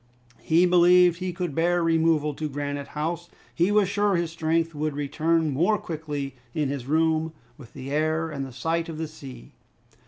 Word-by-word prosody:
He 165 +3 +3
believed 180 0 +5
he 185 -1 -2
could 175 -3 -4
bear 175 +3 +1
removal 160 -2 +2
to 155 +2 -4
Granite 145 0 -4
House. 170 +3 -3 0.2
He 175 +4 +2
was 205 -2 +4
sure 205 0 +1
his 170 -1 -1
strength 165 0 0
would 150 -1 -2
return 155 +2 0
more 175 +10 +2
quickly 150 -5 -5 0.2
in 150 -3 0
his 135 -3 -4
room, 160 +1 +1 0.2
with 135 -6 -14
the 135 +1 -7
air 155 +2 0
and 135 -2 -5
sight 165 +7 -2
of 160 - -6
the 160 0 -3
sea! 135 -6 -11
160 Hz, 175 wpm, -25 LUFS, 145-170 Hz, 0.2 s, believed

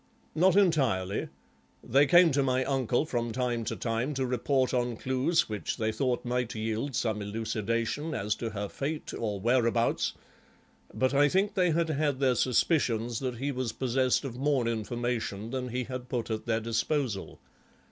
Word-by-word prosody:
"Not 185 +5 +4
entirely; 135 - +2 0.6
they 140 +4 +4
came 175 +3 +6
to 140 +1 +2
my 130 -1 +1
uncle 130 0 +1
from 120 -5 -2
time 120 -1 -1
to - - -2
time 120 +5 -2
to 130 0 0
report 130 +1 +1
on 120 -2 0
clues 130 +7 +1
which 105 -2 -3
they 110 -2 0
thought 125 +2 -1
might 125 -1 -1
yield 110 +5 -2
some 110 -3 -1
elucidation 115 +7 -2
as 105 +2 0
to 115 - -3
her 105 -1 -4
fate 150 +8 -4
or 105 -3 -3
whereabouts, 115 +1 +1 0.8
but 130 +1 0
I 145 +1 +5
think 195 +4 +1
they 180 -2 +2
had 155 -4 +1
their 130 -2 +3
suspicions 120 -3 +1
that 125 -3 -3
he 140 +4 -2
was 125 -4 -3
possessed 130 +1 +1
of 125 -2 -6
more 135 -4 +1
information 115 -1 -2
than 130 -1 -3
he 125 +2 -2
had 125 0 -7
put 120 -2 -2
at 110 +1 -4
their 115 -1 +1
disposal. 115 -1 -2
125 Hz, 165 wpm, -29 LUFS, 115-135 Hz, 0.8 s, came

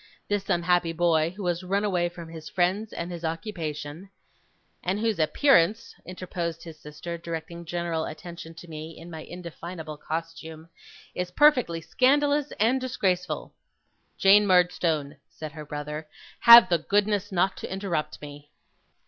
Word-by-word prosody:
This 205 -1 -2
unhappy 175 -1 +2
boy 165 -1 +2
who 200 - -5
has 175 0 0
run 195 +3 0
away 180 -4 +1
from 170 -1 -10
his 160 -1 -9
friends 190 +4 0
and 170 +1 -5
his 170 -1 -7
occupation 165 -1 -5 0.4
' - - -42
'And 190 +3 -1
whose 220 -4 0
appearance,' 205 - +3
interposed 175 -2 -5
his 160 -2 -11
sister, 155 +3 -7
directing 170 +1 -6
general 170 -1 -2
attention 165 +1 -9
to 175 - -12
me 160 0 -8
in 170 +1 -11
my 160 -1 -7
indefinable 170 -2 -8
costume, 160 0 -6 0.4
'is 180 0 -3
perfectly 250 - +3
scandalous 285 - +2
and 240 +5 +3
disgraceful.' 190 -8 -1 0.6
'Jane 205 +1 +6
Murdstone,' 170 -5 +2
said 155 -1 -8
her 155 -1 -9
brother, 150 +1 -5 0.3
'have 235 -4 +10
the 170 -2 +3
goodness 205 +3 0
not 190 +1 +1
to - - -7
interrupt 190 -5 -3
me. 145 0 -10
175 Hz, 145 wpm, -26 LUFS, 160-195 Hz, 0.6 s, have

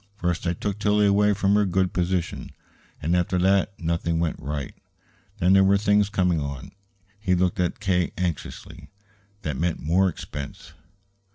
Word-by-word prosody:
First 90 -3 -2
I 85 - +1
took 100 +3 -4
Tillie 105 0 +3
away 105 +1 +4
from 100 0 +2
her 105 0 +4
good 95 -1 0
position, 90 -1 -2 0.5
and 85 +4 +1
after 90 +1 +1
that 95 +2 +2
nothing 85 0 -1
went 85 -2 -1
right. 70 0 -4 0.6
Then 95 -1 +3
there 95 0 +6
were 100 +1 +4
things 105 0 +2
coming 90 -5 +1
on" 70 -3 -6 0.5
he 95 -3 +1
looked 90 +1 0
at 90 +7 -1
K. 95 -4 +1
anxiously 90 -4 -5 0.5
"that 75 -4 -3
meant 85 0 0
more 90 +5 +2
expense. 75 0 -8
90 Hz, 160 wpm, -24 LUFS, 85-100 Hz, 0.6 s, there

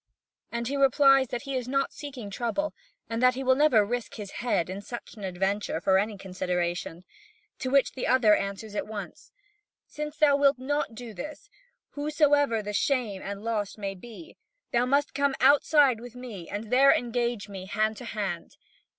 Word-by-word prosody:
And 235 0 -3
he 280 - -2
replies 275 -1 +5
that 240 +2 -4
he 275 -1 -4
is 250 -2 -2
not 275 +1 0
seeking 260 -8 -8
trouble, 245 +8 -2 0.3
and 230 +1 -3
that 255 0 +5
he 265 - -4
will 260 0 +4
never 260 -7 +4
risk 240 +1 -4
his 205 -3 -7
head 235 -9 +1
in 190 +2 -6
such 240 +4 -8
an 210 - -11
adventure 190 +2 -1
for 190 0 +3
any 210 +1 -2
consideration. 180 -2 -3 0.6
To 260 - -2
which 275 0 +3
the 260 - -3
other 230 -5 +5
answers 200 +2 -4
at 210 - -3
once: 210 -2 -8 0.5
"Since 300 0 -6
thou 295 -2 +5
wilt 280 -1 +4
not 275 -2 -2
do 235 -1 -8
this, 300 - -8 0.4
whosesoever 290 -5 +2
the 210 0 -5
shame 220 -4 0
and 200 +1 -6
loss 215 -3 -2
may 200 -2 -4
be, 235 - -12 0.3
thou 240 +1 +2
must 285 +2 +1
come 280 0 +1
outside 280 -1 +5
with 245 0 -11
me 230 -9 -8
and 210 +2 -5
there 270 +2 +7
engage 240 -2 -1
me 190 -2 -8
hand 215 +2 0
to 250 - -8
hand." 200 -7 -4
240 Hz, 180 wpm, -27 LUFS, 205-275 Hz, 0.6 s, there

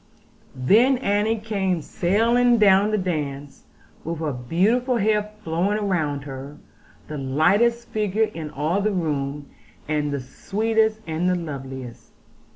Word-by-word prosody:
Then 225 - +4
Annie 215 -1 +1
came 195 -6 -1
sailing 235 +9 +2
down 200 -1 +5
the 215 - +1
dance, 145 -7 -4 0.4
with 165 +1 -4
her 155 -2 -2
beautiful 210 - +1
hair 210 0 +1
flowing 195 +6 0
round 150 -7 -1
her; 140 +1 -8 0.5
the 150 -1 -5
lightest 195 - +2
figure 215 0 0
in 160 -2 -6
all 155 +8 -1
the 210 +1 0
room, 145 -4 -2 0.4
and 150 -1 -1
the 140 - -2
sweetest, 220 - 0
and 165 +3 -1
the 180 - +2
loveliest. 135 -7 -7
180 Hz, 130 wpm, -23 LUFS, 145-215 Hz, 0.5 s, down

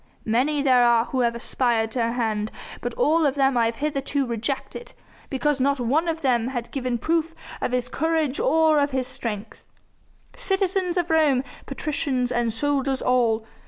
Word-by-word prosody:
Many 275 +6 +1
there 255 -3 +5
are 235 -1 +4
who 260 - -3
have 235 -1 +1
aspired 235 -2 0
to 245 - -1
her 230 0 0
hand, 220 -3 -1 0.3
but - - -4
all 330 -9 +3
of 285 -2 +2
them 270 -1 +3
have 240 - +2
I - - -19
hitherto 280 -1 -1
rejected, 240 - -4 0.4
because 280 +1 0
not 280 +1 +1
one 280 +8 +1
of 325 -1 -2
them 245 -4 +1
had 240 -3 -4
given 255 -3 -2
proof 330 +4 -1 0.3
of - - -1
his 250 -1 -1
courage 315 0 0
or 315 -1 +3
of 285 0 +2
his 260 -2 -1
strength. 225 -4 -6 0.7
Citizens 380 -2 0
of 345 -2 0
Rome, 295 -5 +3 0.2
patricians, 275 -3 -2
and 240 -2 0
soldiers 275 +2 0
all! 230 -3 +2
265 Hz, 170 wpm, -24 LUFS, 240-300 Hz, 0.7 s, there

